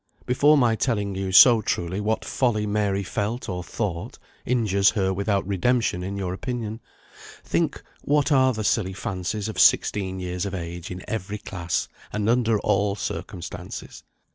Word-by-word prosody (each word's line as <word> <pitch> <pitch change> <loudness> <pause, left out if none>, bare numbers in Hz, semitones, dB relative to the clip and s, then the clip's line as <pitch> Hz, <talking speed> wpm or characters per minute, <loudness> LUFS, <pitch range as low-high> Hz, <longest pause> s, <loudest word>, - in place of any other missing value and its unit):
Before 145 +4 +4
my 120 -4 +3
telling 105 -4 -1
you 95 0 -3
so 115 +4 +8
truly 90 0 -2
what 110 +2 -1
folly 115 -5 0
Mary 100 -1 0
felt 105 +6 -3
or 90 -2 -4
thought, 100 +1 -4 0.3
injures 105 -5 +3
her 95 -3 0
without 100 0 0
redemption 100 0 +1
in 95 +2 -4
your 95 -2 -3
opinion, 115 +1 -4 0.6
think - - -1 0.2
what 145 +1 +1
are 130 -2 +5
the 110 -3 -4
silly 100 -2 +1
fancies 95 +3 -3
of 110 - -5
sixteen 95 -2 +3
years 90 -1 -3
of 100 - -4
age 85 0 -6
in 90 0 -7
every 105 -1 -3
class, 90 -4 -3 0.2
and 105 0 -2
under 115 -2 +2
all 100 0 +1
circumstances. 90 -3 -6
100 Hz, 155 wpm, -24 LUFS, 95-115 Hz, 0.6 s, so